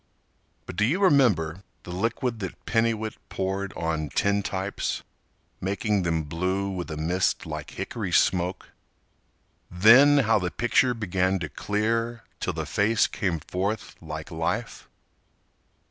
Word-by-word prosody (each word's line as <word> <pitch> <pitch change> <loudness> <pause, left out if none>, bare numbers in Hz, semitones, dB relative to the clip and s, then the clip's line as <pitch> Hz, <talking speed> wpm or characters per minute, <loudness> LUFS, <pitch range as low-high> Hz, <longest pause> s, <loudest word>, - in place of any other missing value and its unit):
But 95 - -8
do 105 - +3
you 145 - +2
remember 105 - +3 0.2
the 90 - -8
liquid 115 +5 -1
that 95 -3 -7
Penniwit 115 -1 0
Poured 95 +1 -2
on 80 -2 -2
tintypes 100 +4 -1 0.6
making 100 +2 0
them 85 -2 0
blue 90 +6 -1
With 90 -2 -4
a 80 - -5
mist 90 +4 0
like - - -6
hickory - - -4
smoke? 90 +1 +1 1.0
Then 125 +11 +7
how 110 -1 +4
the 90 -1 -1
picture 120 +4 +2
began 95 -3 0
to 85 -5 -4
clear 115 +5 -1 0.2
Till 95 - -2
the 80 -1 -3
face 105 +7 +2
came 85 -5 -2
forth 100 +7 -3
like - - -7
life? - - -3
95 Hz, 130 wpm, -26 LUFS, 90-110 Hz, 1.0 s, Then